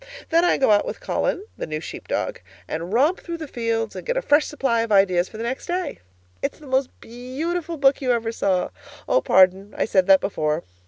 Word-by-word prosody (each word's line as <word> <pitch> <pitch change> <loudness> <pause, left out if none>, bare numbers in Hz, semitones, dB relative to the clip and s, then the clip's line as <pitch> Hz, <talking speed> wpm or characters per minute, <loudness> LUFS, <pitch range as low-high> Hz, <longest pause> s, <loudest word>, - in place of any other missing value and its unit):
Then 335 +1 +4
I 350 - +3
go 265 - +3
out 205 - +5
with - - -5
Colin 390 - -1
(the - - -3
new 155 -1 -3
sheep 160 - -9
dog) - - -2 0.3
and 165 +3 -4
romp 285 - +3
through 340 -1 -6
the 315 -2 -7
fields 230 -3 -2
and - - -6
get - - -1
a - - +1
fresh 295 -5 +4
supply 270 -6 0
of 230 -1 -3
ideas 185 -3 +3
for 215 - -10
the 225 - -4
next 250 +3 -4
day. 360 +1 -3 0.4
It's - - -2
the 305 - -15
most 265 -1 +1
beautiful 305 +9 -4
book 275 -1 +3
you 255 -2 +1
ever 230 -2 0
saw 190 -5 0 0.4
Oh, - - +3
pardon 190 +2 +3
I - - +1
said 190 -3 +2
that 195 -1 +7
before. 155 -4 -1
235 Hz, 220 wpm, -23 LUFS, 195-300 Hz, 0.4 s, that